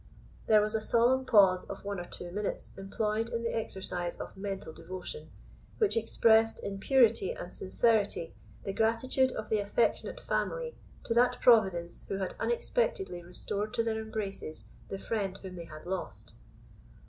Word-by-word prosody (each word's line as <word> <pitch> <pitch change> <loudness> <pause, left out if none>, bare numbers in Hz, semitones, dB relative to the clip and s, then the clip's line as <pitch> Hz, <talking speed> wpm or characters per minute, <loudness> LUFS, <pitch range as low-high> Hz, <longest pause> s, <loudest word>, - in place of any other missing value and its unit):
There 215 -1 +6
was 210 +1 0
a 220 - 0
solemn 245 +4 +3
pause 190 -5 +5
of 200 - -7
one 200 -2 -3
or 175 - -5
two 175 - -8
minutes 205 +2 -3
employed 210 +3 -1
in 230 0 -2
the 230 - -1
exercise 185 -5 -3
of - - -7
mental 195 -4 -5
devotion, 180 -4 -7 0.5
which 430 -4 +2
expressed, 225 0 +4
in 195 -1 -4
purity 230 -3 +4
and 175 - -8
sincerity, 205 -3 +1 0.3
the 195 - -3
gratitude 245 +5 +2
of 215 - -5
the 215 - +2
affectionate 205 - 0
family - - -2 0.3
to - - -1
that 245 +1 +4
Providence 190 -8 +3
who - - -2
had 190 -2 -2
unexpectedly 240 - 0
restored 200 +4 -4
to 230 - +2
their 220 -1 -1
embraces 200 -7 -5 0.2
the 195 - -3
friend 195 -2 -2
whom 190 -2 -9
they 170 -1 -7
had 155 -1 -11
lost. 185 0 -5
210 Hz, 160 wpm, -31 LUFS, 190-230 Hz, 0.5 s, There